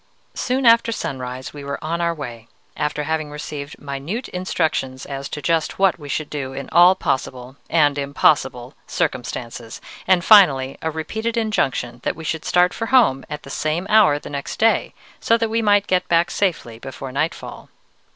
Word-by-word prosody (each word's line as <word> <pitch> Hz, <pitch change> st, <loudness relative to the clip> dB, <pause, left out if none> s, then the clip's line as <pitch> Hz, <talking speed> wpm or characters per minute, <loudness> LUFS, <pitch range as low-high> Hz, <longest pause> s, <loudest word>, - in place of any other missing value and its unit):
"Soon 255 Hz, +1 st, -1 dB
after 230 Hz, 0 st, +5 dB
sunrise 130 Hz, -, -5 dB
we 145 Hz, -1 st, -9 dB
were 140 Hz, 0 st, -4 dB
on 170 Hz, +2 st, -2 dB
our 170 Hz, 0 st, +1 dB
way, 120 Hz, -8 st, -8 dB, 0.3 s
after 150 Hz, 0 st, -2 dB
having 155 Hz, 0 st, -2 dB
received 150 Hz, 0 st, -7 dB
minute 145 Hz, -, -5 dB
instructions 160 Hz, -7 st, -2 dB
as 140 Hz, 0 st, -6 dB
to 150 Hz, -, -6 dB
just 165 Hz, +3 st, 0 dB
what 190 Hz, -2 st, +2 dB
we 145 Hz, -2 st, -10 dB
should 155 Hz, +2 st, -2 dB
do 135 Hz, -3 st, -5 dB
in 135 Hz, 0 st, -6 dB
all 175 Hz, +2 st, +7 dB
possible 130 Hz, -5 st, -3 dB
and 145 Hz, -3 st, +3 dB
impossible 140 Hz, -4 st, +1 dB
circumstances, 120 Hz, -1 st, -4 dB, 0.3 s
and 180 Hz, -2 st, +3 dB
finally 135 Hz, -11 st, +6 dB
a 160 Hz, -, -1 dB
repeated 220 Hz, +9 st, -3 dB
injunction 135 Hz, -, -1 dB
that -, -, -2 dB
we 160 Hz, -, -9 dB
should 160 Hz, 0 st, -3 dB
start 180 Hz, 0 st, +3 dB
for 225 Hz, -, -4 dB
home 220 Hz, -, +4 dB
at 150 Hz, 0 st, -6 dB
the 135 Hz, -, -10 dB
same 155 Hz, +6 st, -1 dB
hour 210 Hz, -9 st, +6 dB
the -, -, -10 dB
next 140 Hz, -1 st, -5 dB
day, 225 Hz, +1 st, +2 dB, 0.2 s
so 230 Hz, -, +3 dB
that 225 Hz, -1 st, -1 dB
we 230 Hz, +1 st, +1 dB
might 205 Hz, -2 st, +3 dB
get 185 Hz, -2 st, +1 dB, 0.3 s
safely 165 Hz, -, -1 dB
back -, -, -35 dB
before 135 Hz, 0 st, -7 dB
nightfall. 155 Hz, +5 st, -4 dB
150 Hz, 175 wpm, -21 LUFS, 135-185 Hz, 0.3 s, all